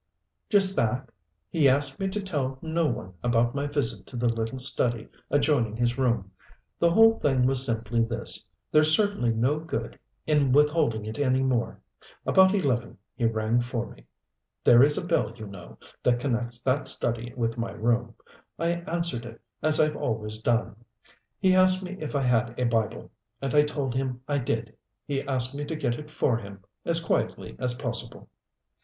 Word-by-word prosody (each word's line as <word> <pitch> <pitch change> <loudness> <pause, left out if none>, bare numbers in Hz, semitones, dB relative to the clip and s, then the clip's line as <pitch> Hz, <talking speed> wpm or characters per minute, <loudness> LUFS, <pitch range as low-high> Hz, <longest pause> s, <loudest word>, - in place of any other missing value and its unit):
"Just 195 -2 +5
that 125 +2 -1 0.4
he 150 -5 +4
asked 135 0 +1
me 195 - -1
to 205 +2 -3
tell 140 -8 -3
no 165 0 0
one 95 -8 -4
about 120 0 +1
my 140 +1 -2
visit 145 -4 -2
to - - -8
the 120 -1 +1
little 115 +2 -3
study 120 -3 +1 0.2
adjoining 140 -7 +1
his 120 +1 0
room. 115 -7 0 0.5
The 170 - +4
whole 225 +5 +5
thing 130 -3 +2
was 130 0 +2
simply 115 -1 -1
this 115 +1 -3 0.3
there's 155 0 +6
certainly 205 - +1
no 125 +7 +1
good 160 +1 -5 0.3
in 145 -4 +2
withholding 150 -7 +2
it 110 +3 -6
any 130 -2 +2
more. 125 -3 -1 0.5
About 190 +1 +5
eleven 130 - -1 0.2
he 120 - -2
rang 110 +1 +1
for 120 -1 -3
me. - - -17 0.6
There 120 0 +7
is 145 +2 +5
a - - -3
bell, 165 -9 0
you 110 -2 -9
know, 100 -4 -11 0.2
that 120 -1 +2
connects 120 -2 -2
that 135 +3 0
study 120 0 0
with 115 -1 -2
my 115 - -2
room. 115 0 -1 0.4
I 170 +1 -1
answered 170 -8 -1
it 115 -1 -10 0.2
as 155 0 +3
I've 155 -1 +2
always 110 -1 -3
done. 115 -2 0 0.6
He 190 -1 +3
asked 185 0 +7
me 185 +1 -6
if 155 -1 -5
I 140 - +1
had 120 -1 0
a - - +1
Bible 115 -3 -1 0.3
and 135 0 -3
I 150 0 +5
told 145 -4 -3
him 130 -1 -3
I 145 -1 0
did. 115 -3 -3 0.3
He 140 -1 -2
asked 130 -2 -2
me 145 +1 -4
to 160 - -4
get 120 -5 -2
it 150 0 -10
for 125 -5 0
him, 100 -3 -10 0.2
as 170 0 +3
quietly 165 - -2
as 125 -1 -1
possible. - - -5
130 Hz, 180 wpm, -26 LUFS, 115-150 Hz, 0.6 s, There